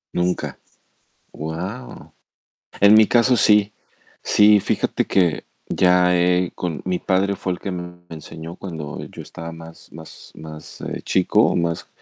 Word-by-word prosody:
Nunca. 90 +1 -1 0.7
Guau. 90 - -7 0.7
En 100 +1 +7
mi 110 -1 +7
caso, 120 +1 +3
sí. 105 -1 +4 0.5
Sí, 105 0 +5
fíjate - - -1
que 90 -5 +1 0.3
ya 90 0 +3
he 90 0 +2
con 85 -3 -4
mi 90 -1 -1
padre 100 +1 +1
fue 95 - -3
el - - -12
que 100 - -4
me 90 -1 -6 0.2
enseñó 80 +2 -9
cuando 80 -6 -7
yo - - -10
estaba 80 0 -9
más 80 0 -13
más 80 0 -13
más, 80 0 -11
eh, - - -5
chico - - +2
o, - - +2
más 85 -1 -2
90 Hz, 145 wpm, -21 LUFS, 80-100 Hz, 0.7 s, En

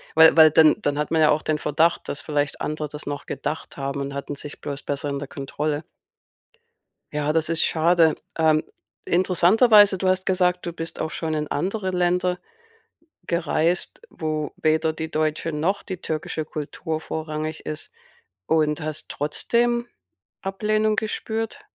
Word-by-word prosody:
Weil 160 0 +8
weil 160 -1 +9
dann 155 0 +5
dann 145 0 0
hat 150 +1 -2
man 160 -1 +3
ja 155 - +6
auch 150 - +3
den 155 - 0
Verdacht, 160 +4 +1
dass 145 - -4
vielleicht 145 -2 -2
andere 155 0 -3
das 150 +1 -8
noch 145 0 -5
gedacht 145 +3 -5
haben 140 0 -3
und 140 0 -4
hatten 140 +1 -4
sich 145 +1 -9
bloß 140 0 -5
besser 145 0 -2
in 140 0 -2
der 145 - -6
Kontrolle. 150 +2 -3 1.3
Ja, 150 0 0
das 160 -1 +2
ist 165 -1 +1
schade. 165 0 +4 0.2
Ähm, 155 -1 +4 0.4
interessanterweise 195 +3 +5
du 185 - 0
hast 185 0 +1
gesagt, 180 -1 +1
du 170 - -3
bist 165 0 -6
auch 160 - -2
schon 160 -1 -3
in 150 -1 -2
andere 190 +5 -2
Länder 180 0 +1 0.9
gereist, 170 - 0
wo 155 -1 -3
weder 160 0 +1
die 160 0 -5
deutsche 155 +1 -1
noch 170 +7 -1
die 185 -3 -6
türkische 155 0 -3
Kultur 155 +1 -5
vorrangig 155 0 -4
ist 155 0 -6 0.6
und 155 -2 +2
hast 155 -1 -5
trotzdem 235 +11 0 0.5
Ablehnung 215 +2 0
gespürt. 220 +1 -3
160 Hz, 155 wpm, -23 LUFS, 150-180 Hz, 1.3 s, weil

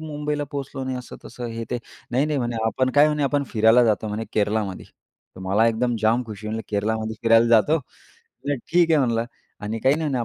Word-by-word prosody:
मुंबईला 150 -1 -3
पोहोचलो 135 -1 -5
नाही, 130 -1 -3
असं 125 - -10
तसं, 120 -1 -7
हे 115 0 -5
ते. 125 - -1 0.3
नाही, 135 +5 +1
नाही, 150 -2 -1
म्हणे 120 -2 -2
आपण 130 +4 0
काय 145 +1 +7
म्हणे 150 -1 -1
आपण 140 +1 0
फिरायला 110 +2 +5
जातो 110 -1 +1
म्हणे 105 +2 -3
केरलामध्ये. 105 -2 -1 0.5
तर - - -10
मला 105 +4 +3
एकदम 120 +1 0
जाम 115 +3 +3
खुशी. 110 0 -8
म्हटलं 110 +1 -3
केरलामध्ये 110 +2 -1
फिरायला 115 0 +5
जातो 120 +8 +4 0.7
ठीक 165 +5 +1
आहे 155 - +5
म्हणलं 115 -3 +1 0.4
आणि 105 +2 -4
काही 135 +2 +4
नाही 160 -2 -2
म्हणे 125 -3 -1
120 Hz, 200 wpm, -23 LUFS, 110-140 Hz, 0.7 s, काय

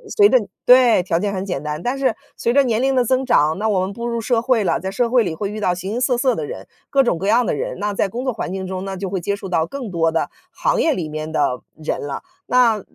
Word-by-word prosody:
随 410 -2 +6
着 - - +6 0.3
对， 245 -6 +6
条 170 -2 0
件 200 +2 -1
很 190 0 -3
简 180 -8 -3
单， 150 +2 -4
但 255 +3 -1
是 260 -5 +1 0.2
随 235 - 0
着 280 +1 +5
年 235 -3 0
龄 270 0 +2
的 250 - +4
增 260 +2 +1
长， 155 - +3
那 220 - 0
我 200 -4 +2
们 185 +1 -2
步 235 +3 -5
入 235 -1 -2
社 230 0 +1
会 240 -3 +2
了， 180 - +1
在 190 - -4
社 235 +4 0
会 245 -1 +4
里 170 -5 -3
会 200 +4 -3
遇 215 - -5
到 180 -4 +1
形 185 +2 -5
形 235 - -2
色 250 -1 +1
色 255 0 +2
的 - - -3
人， 475 +3 -8 0.2
各 275 -1 +4
种 240 -9 +1
各 190 +4 -3
样 235 +4 +4
的 - - 0
人， 145 - -3
那 205 0 -1
在 200 - +1
工 235 +6 -5
作 260 - 0
环 210 -5 -5
境 190 0 -4
中， 185 0 -5
那 195 -1 -4
就 190 0 -4
会 190 0 -2
接 200 +4 -2
触 195 -1 -8
到 165 -3 +1
更 245 +3 -6
多 165 -2 +2
的 160 0 -1 0.2
行 - - 0
业 320 - +3
里 165 - -4
面 155 +1 -5
的 145 -5 0 0.2
人 155 -1 -3
了。 145 -1 -5 0.2
那 235 -4 +3
205 Hz, 315 characters per minute, -20 LUFS, 180-245 Hz, 0.3 s, 随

